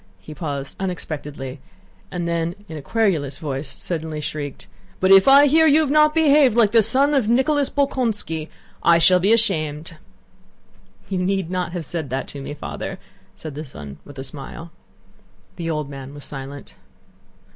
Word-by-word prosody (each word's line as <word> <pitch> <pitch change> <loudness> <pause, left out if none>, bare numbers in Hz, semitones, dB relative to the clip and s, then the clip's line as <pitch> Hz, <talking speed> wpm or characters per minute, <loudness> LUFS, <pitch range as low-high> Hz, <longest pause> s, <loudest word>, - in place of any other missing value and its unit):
he 100 +11 -10
paused 140 -4 -5
unexpectedly, 150 -7 -5 0.5
and 175 -1 -3
then 170 +1 -1
in 160 - -8
a 150 - -6
querulous 165 -8 0
voice 145 -3 -4
suddenly 160 +1 -4
shrieked: 145 -2 -5 0.3
"but 190 +1 +3
if 195 +3 +8
I 280 +2 +8
hear 320 +3 +5
that - - +5
you 310 - +6
have 295 -3 0
not 305 +1 +4
behaved 290 -6 +4
like 220 -3 +4
a 230 - +7
son 265 +7 +3
of 255 -7 +2
Nicholas 275 +4 +2
Bolkónski, 225 - -1 0.3
I 170 0 +5
shall 180 +2 +5
be 195 +4 +2
ashamed!" 165 -8 +1 1.1
"You 190 -2 -2
need 185 -1 -1
not 180 -2 -2
have 175 -3 -4
said 160 -4 -4
that 130 +1 -3
to 140 - -8
me, 145 +2 -6
Father," - - -6 0.4
said 155 -2 -8
the 150 +2 -6
son 75 - -10
with 145 -1 -13
a 135 - -5
smile. 150 +4 -9 0.9
The 165 -2 -3
old 150 -3 -2
man 135 0 -9
was 145 - -9
silent. 140 0 -8
170 Hz, 170 wpm, -21 LUFS, 145-225 Hz, 1.1 s, if